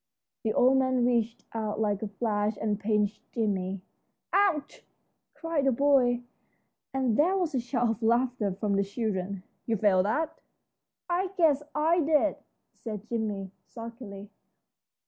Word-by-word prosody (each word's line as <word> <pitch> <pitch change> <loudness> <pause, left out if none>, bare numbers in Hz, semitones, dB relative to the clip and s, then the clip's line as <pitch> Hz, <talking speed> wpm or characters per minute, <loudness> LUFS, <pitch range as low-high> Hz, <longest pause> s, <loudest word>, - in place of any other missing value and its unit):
The 220 - 0
old 260 +2 +5
man 260 -2 +2
reached 235 -2 0
out 215 -2 -2
like 205 -2 0
a 215 - -2
flash 210 0 -1
and 210 -1 -1
pinched 210 -1 0
Jimmie. 195 -4 -1 0.5
"Ouch!" 385 -7 +1 0.5
cried 330 -4 -1
the 270 - +4
boy, 250 -2 +3 0.7
and 260 -5 +1
there 360 +6 +4
was 345 -5 -1
a 260 - +1
shout 245 0 0
of 225 0 -2
laughter 235 -2 +2
from 200 +1 -1
the 200 - +3
children. 200 -3 -3 0.2
"You 225 -1 +1
felt 190 -2 +3
that?" 315 +9 -1 0.7
"I 360 +2 +1
guess 305 -5 +4
I 320 +3 +3
did," 310 -1 +2 0.4
said 215 -4 -6
Jim, 210 -5 -3 0.2
sulkily. 230 -4 -9
230 Hz, 140 wpm, -28 LUFS, 210-270 Hz, 0.7 s, old